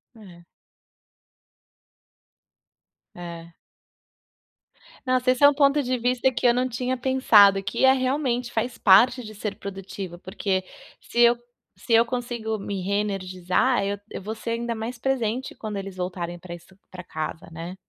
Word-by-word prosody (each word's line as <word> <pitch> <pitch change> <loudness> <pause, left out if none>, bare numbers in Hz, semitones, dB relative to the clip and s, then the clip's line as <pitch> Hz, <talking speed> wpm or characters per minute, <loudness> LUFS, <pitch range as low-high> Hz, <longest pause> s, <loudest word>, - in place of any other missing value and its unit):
É. 180 -6 -15 2.7
É. 170 -1 -9 1.5
Nossa, 255 0 +1
esse 255 +2 +2
é - - +11
um - - 0
ponto 280 0 +3
de 255 -1 -1
vista 250 +2 +1
que 245 - +1
eu 235 - +5
não 250 +1 0
tinha 250 +1 -2
pensado, 220 -7 +5
que 235 +7 +1
é 265 - +7
realmente, 255 -2 -1
faz 235 +2 -2
parte 235 +6 +5
de 215 -1 -10
ser 205 -1 -4
produtiva, 195 -3 -7
porque 190 0 -2 0.4
se 240 - -5
eu 240 0 +6 0.4
se - - -9
eu 230 +1 +6
consigo 235 -2 -3
me 200 -2 -5
reenergizar, 195 +3 0
eu 200 0 -3
eu - - -6
vou 215 +3 -5
ser 225 +1 -5
ainda 235 0 -2
mais 230 +2 -5
presente 255 -1 -2
quando 215 -2 -6
eles 195 -1 -6
voltarem 175 -1 -4
pra 175 -1 -8
isso 175 +3 -17
pra 180 -1 -9
casa, 155 -1 -6
né? 165 +3 -7
220 Hz, 150 wpm, -24 LUFS, 190-250 Hz, 2.7 s, é